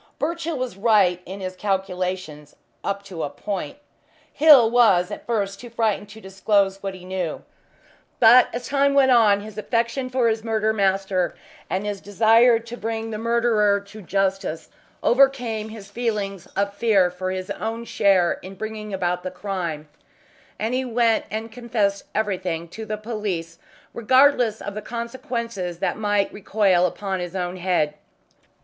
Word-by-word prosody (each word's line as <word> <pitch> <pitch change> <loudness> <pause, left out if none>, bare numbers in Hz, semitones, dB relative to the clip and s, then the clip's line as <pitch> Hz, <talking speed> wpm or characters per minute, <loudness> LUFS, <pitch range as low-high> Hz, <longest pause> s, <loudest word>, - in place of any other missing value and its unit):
Birchill 335 +1 -2
was 250 -7 -4
right 195 -5 +3
in 195 +2 -7
his 185 0 -5
calculations 185 -6 -3 0.3
up 200 0 -2
to 185 -5 -7
a - - -2
point. 195 - -5 0.6
Hill 280 -7 +7
was 205 -8 +4
at - - -8
first 200 -4 -1
too 240 - -10
frightened 220 -3 -1
to 220 +2 -12
disclose 195 0 0
what 195 -1 -4
he 180 -1 -12
knew, 185 -3 -4 0.8
but 240 +2 +7
as 240 +1 -5
time 280 0 +2
went 270 -2 +5
on 215 -4 +5
his 215 0 -8
affection 235 +4 -1
for 255 -2 +1
his 220 -1 0
murdered 220 -1 0
master, 195 -3 0 0.3
and 190 +2 -2
his 205 -1 -4
desire 225 +3 +4
to 230 +1 -8
bring 225 -1 -4
the 215 - -4
murderer 225 -3 +2
to 200 +2 -13
justice, 195 -3 -2 0.3
overcame 245 -4 +2
his 210 -2 -11
feelings 205 -5 -3
of 200 +1 0
fear 200 -4 +3
for 185 +1 -4
his 185 0 -4
own 225 +1 -4
share 190 -5 +2
in 190 +1 -10
bringing 215 +1 -6
about 180 -1 -1
the 185 - -4
crime, 180 -5 -4 0.7
and 220 +3 -2
he 260 +1 0
went 235 -2 +1
and 220 +3 -5
confessed 220 -4 -1
everything 185 -6 -2
to 220 +6 -8
the 215 - -3
police, 205 -7 -4 0.3
regardless 245 -2 +3
of 205 - -5
the 215 - -5
consequences 235 -5 -4
that - - -1
might 205 -2 0
recoil 195 -3 +2
upon 190 +1 -4
his 175 +1 -5
own 180 0 -3
head. 175 -5 0
205 Hz, 155 wpm, -23 LUFS, 190-230 Hz, 0.8 s, Hill